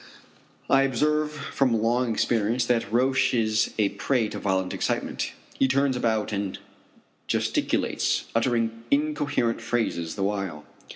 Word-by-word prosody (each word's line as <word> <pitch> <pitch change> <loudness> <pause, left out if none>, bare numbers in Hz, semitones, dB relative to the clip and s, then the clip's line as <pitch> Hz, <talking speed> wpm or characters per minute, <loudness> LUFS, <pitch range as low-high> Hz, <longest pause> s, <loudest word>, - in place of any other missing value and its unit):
I 135 - +5
observe 150 +3 +1
from 140 -5 0
long 120 +2 +1
experience 115 +2 +1
that 115 -4 0
Roch 130 +2 +2
is 110 -2 +1
a 105 -2 +3
prey 110 +2 0
to - - -6
violent 95 -2 0
excitement. - - -2 0.3
He 135 - +4
turns 135 0 +2
about 110 -4 0
and 100 -2 -2 0.7
gesticulates, - - 0
uttering 115 -1 0
incoherent 145 -5 0
phrases 85 -9 -1
the 100 - -2
while. 95 -7 -2
115 Hz, 125 wpm, -26 LUFS, 105-135 Hz, 0.7 s, I